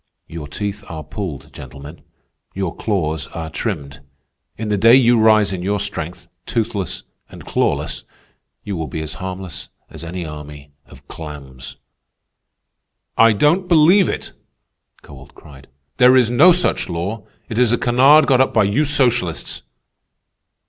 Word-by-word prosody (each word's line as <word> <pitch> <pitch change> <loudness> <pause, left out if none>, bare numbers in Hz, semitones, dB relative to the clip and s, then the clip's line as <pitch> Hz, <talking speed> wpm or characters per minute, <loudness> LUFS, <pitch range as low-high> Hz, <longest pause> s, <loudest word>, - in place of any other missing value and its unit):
Your 80 -3 -8
teeth 100 +7 -5
are 80 -2 -6
pulled, 80 -2 -7
gentlemen. 70 +5 -11 0.5
Your 95 -3 -3
claws 80 -8 -2
are 80 -1 -5
trimmed. 75 -10 -4 0.6
In 110 0 -4
the 105 - +1
day 115 +5 +6
you 120 -3 +4
rise 110 -2 +4
in 90 - -4
your 100 +3 -1
strength, 90 -3 -5 0.2
toothless 105 -5 -2 0.3
and - - -12
clawless, - - -1 0.6
you 100 -2 -4
will 80 -2 -4
be 80 - -5
as 80 - -6
harmless 95 -3 -6 0.2
as - - -9
any 85 +1 -5
army 75 -2 -10 0.2
of - - -17
clams." 70 -5 -9 1.4
"I 115 0 +5
don't 160 - +2
believe 175 +3 +5
it!" - - -5 0.7
Kowalt 70 -1 -14
cried. 70 -3 -15 0.3
"There 125 +1 +6
is 120 -2 +3
no 150 +9 +7
such 180 - +1
law. 95 +5 -4 0.2
It 115 - -3
is 125 -3 +4
a 120 - +2
canard 135 +7 +5
got 130 -2 +4
up 130 - 0
by 110 - +5
you 105 +10 +1
socialists." 120 - 0
100 Hz, 145 wpm, -19 LUFS, 80-120 Hz, 1.4 s, no